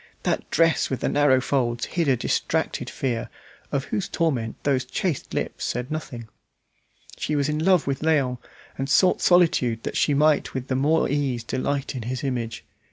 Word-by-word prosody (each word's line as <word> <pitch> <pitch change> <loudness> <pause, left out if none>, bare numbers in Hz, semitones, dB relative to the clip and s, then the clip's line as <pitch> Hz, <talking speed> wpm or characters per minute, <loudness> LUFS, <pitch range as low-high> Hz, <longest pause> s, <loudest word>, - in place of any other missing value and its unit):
That - - -1
dress 165 -1 +2
with 130 - -3
the - - +1
narrow 145 -3 +4
folds 120 -3 0
hid 170 -3 -1
a 130 -2 +3
distracted - - -1
fear, 120 -4 -3 0.4
of 140 -1 0
whose 190 +5 -3
torment 130 -10 -1
those 135 -3 +1
chaste 150 +4 -3
lips - - -3
said 125 +4 -3
nothing. 125 -7 -5 0.9
She 150 - -2
was 140 -1 +1
in 150 +1 -1
love 185 -2 +4
with 135 -1 -1
Léon, 140 -6 +1 0.4
and 135 +1 -2
sought 180 +6 +4
solitude 145 -10 +3
that - - -4
she 145 - +2
might 150 0 +2
with 130 0 -4
the 130 - +1
more 150 +5 +2
ease 135 -4 -1
delight 135 +4 -2
in 130 - -5
his 125 +4 -4
image. 120 -4 -3
135 Hz, 175 wpm, -24 LUFS, 125-155 Hz, 0.9 s, narrow